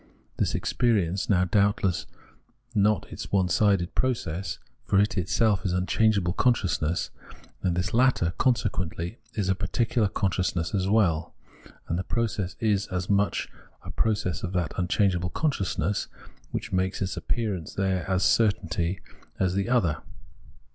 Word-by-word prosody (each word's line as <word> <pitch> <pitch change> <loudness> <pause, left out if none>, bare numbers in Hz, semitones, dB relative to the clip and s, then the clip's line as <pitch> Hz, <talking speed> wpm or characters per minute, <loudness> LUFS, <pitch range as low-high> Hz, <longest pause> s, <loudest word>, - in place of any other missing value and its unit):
This - - 0
experience 100 -7 +1
is - - -22
now 90 -3 +4
doubtless 100 -2 +1 0.7
not 105 0 +2
its - - -6
own 95 -2 +3
onesided 95 -1 +2
process; 100 -8 -1 0.3
for 100 - +2
it 105 +3 +2
is 95 - +2
itself 105 -2 +2
unchangeable 95 0 +2
con 125 +4 +4
sciousness; 85 -5 -1 0.5
and 90 -2 0
this 90 +2 -1
latter, 120 -8 +3
consequently, 95 - 0 0.2
is 105 -4 -1
a 95 - +3
particu 105 +5 -2
lar 105 -4 +4
consciousness 90 -4 -1
as 95 -2 +1
well; 85 -7 +2 0.5
and 85 - -1
the - - -2
process 105 -6 -2
is 105 -4 +1
as 90 +1 -2
much 100 0 +1 0.4
a - - -7
process 105 -5 0
of 90 0 -4
that 90 -3 -1
unchangeable 90 0 +1
consciousness, 100 - -1 0.4
which - - -4
makes 95 0 0
its 95 - -3
appearance 100 -9 -3
there 95 -2 0
as 95 0 +2
certainly 90 -4 +1 0.4
as 95 -1 +1
the 100 +4 -1
other. 90 - +2
95 Hz, 145 wpm, -26 LUFS, 90-105 Hz, 0.7 s, now